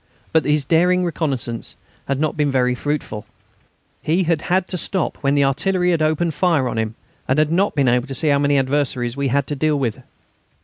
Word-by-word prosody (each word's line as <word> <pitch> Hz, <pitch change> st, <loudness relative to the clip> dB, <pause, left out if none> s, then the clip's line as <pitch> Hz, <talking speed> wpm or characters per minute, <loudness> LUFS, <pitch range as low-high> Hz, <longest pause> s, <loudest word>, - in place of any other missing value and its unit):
But 160 Hz, -1 st, +3 dB
his 150 Hz, -1 st, +1 dB
daring 180 Hz, +4 st, +3 dB
reconnaissance 135 Hz, -8 st, -3 dB, 0.3 s
had 135 Hz, 0 st, -1 dB
not 155 Hz, 0 st, 0 dB
been 150 Hz, -1 st, +1 dB
very 125 Hz, -2 st, +2 dB
fruitful. 130 Hz, -6 st, -4 dB, 0.7 s
He 170 Hz, +5 st, +1 dB
had 165 Hz, -2 st, 0 dB
had 185 Hz, +1 st, 0 dB
to -, -, -3 dB
stop 185 Hz, -1 st, -2 dB
when 140 Hz, 0 st, 0 dB
the 140 Hz, -1 st, +3 dB
artillery 180 Hz, +6 st, +1 dB
had 165 Hz, -2 st, +1 dB
opened 155 Hz, +2 st, +1 dB
fire 155 Hz, -4 st, +1 dB
on 115 Hz, -, -2 dB
him, 110 Hz, 0 st, -2 dB, 0.3 s
and 130 Hz, -, +1 dB
had 155 Hz, 0 st, +2 dB
not 190 Hz, +2 st, +1 dB
been 140 Hz, -3 st, +2 dB
able 125 Hz, +2 st, +2 dB
to 135 Hz, -, -5 dB
see 155 Hz, +3 st, +1 dB
how 140 Hz, -1 st, +3 dB
many 145 Hz, 0 st, +2 dB
adversaries 130 Hz, -3 st, 0 dB
we 140 Hz, 0 st, -1 dB
had 140 Hz, +2 st, +1 dB
to 145 Hz, -, -4 dB
deal 150 Hz, +1 st, +1 dB
with. 120 Hz, -6 st, -2 dB
145 Hz, 210 wpm, -20 LUFS, 135-160 Hz, 0.7 s, But